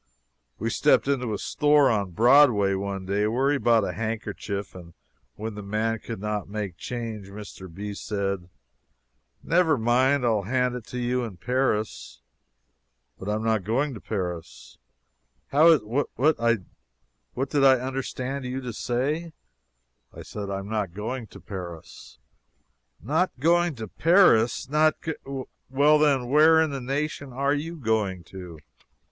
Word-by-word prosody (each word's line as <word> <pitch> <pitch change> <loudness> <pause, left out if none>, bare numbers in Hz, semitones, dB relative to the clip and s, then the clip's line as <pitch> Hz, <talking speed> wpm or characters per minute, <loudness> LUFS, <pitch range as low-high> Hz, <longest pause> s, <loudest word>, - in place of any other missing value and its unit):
We - - -2
stepped - - +3
into 125 -5 0
a 105 - -1
store 145 +3 +3
on 100 -4 0
Broadway 115 - +5
one 95 0 -3
day, 100 +2 0
where 130 +6 +1
he 145 - +1
bought 115 -4 +3
a - - -2
handkerchief, 105 -3 -4
and 85 -2 -12 0.4
when 110 +1 -5
the 105 - -7
man 110 +2 -1
could 115 -2 -7
not 105 -1 -3
make 100 -4 -4
change, 115 -2 -6
Mr. 100 -2 -10
B. 100 +4 -6
said: 100 -3 -3 0.9
"Never 165 -3 +3
mind, 125 +4 +2
I'll 110 -3 +2
hand 125 +4 0
it 125 -3 -7
to 125 - -6
you 125 +1 0
in 110 -6 -7
Paris." 105 - -1 1.0
"But 95 - -5
I 105 - +1
am 110 - -3
not 110 -3 +1
going 130 +8 0
to 110 - -9
Paris." 90 - -6 0.7
"How 150 +4 +5
is 160 -4 +6
what 120 +7 -2 1.4
did 145 -2 +2
I 135 -1 +7
understand 130 +1 -4
you 125 +1 -3
to 125 -3 -6
say?" 145 +9 -2 0.8
"I - - -8
said 100 -2 -6
I 100 - -2
am 100 0 -6
not 105 -5 -3
going 115 +3 -4
to - - -13
Paris." 90 -5 -9 0.8
"Not 160 +9 +1
going 170 +2 +3
to 110 -2 -6
Paris! 155 - +4
Not 155 +2 +2
g 160 - -2 0.6
well, 145 +3 +4
then, 140 -5 +2
where 155 +4 +6
in 160 -2 +2
the 135 -1 -4
nation 140 +1 -3
are 140 +3 0
you 160 +4 -3
going 110 - -1
to?" 90 -2 -10
115 Hz, 155 wpm, -25 LUFS, 100-140 Hz, 1.4 s, I